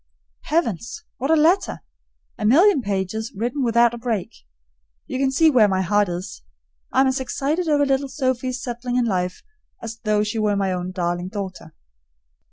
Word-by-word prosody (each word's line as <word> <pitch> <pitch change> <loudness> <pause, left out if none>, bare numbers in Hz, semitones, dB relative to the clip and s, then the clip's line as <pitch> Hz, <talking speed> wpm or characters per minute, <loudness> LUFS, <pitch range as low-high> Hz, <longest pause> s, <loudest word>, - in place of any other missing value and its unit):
Heavens! 230 - -1
what 270 +4 -3
a 320 - +5
letter! 330 +5 +2 0.6
A - - -4
million 305 - +5
pages 205 +1 -3
written 245 +7 -2
without 235 0 +3
a 240 - -6
break. 225 -6 -2 0.7
You 255 - -4
can 270 -1 +2
see 315 +4 +4
where 235 -6 +5
my 190 -1 0
heart 205 +1 +2
is. 175 - -6 0.5
I'm 265 - +4
as 265 0 +1
excited 290 +6 -2
over 290 -1 +3
little 270 0 0
Sophie's 255 -2 -2
settling 245 0 -4
in 250 -1 +2
life 180 -4 -2 0.4
as 230 0 -7
though 210 -1 +1
she 215 +2 -3
were 210 -1 +1
my 195 -2 0
own 180 0 -3
darling 175 -1 -2
daughter. 190 -5 -7
230 Hz, 170 wpm, -22 LUFS, 200-265 Hz, 0.7 s, a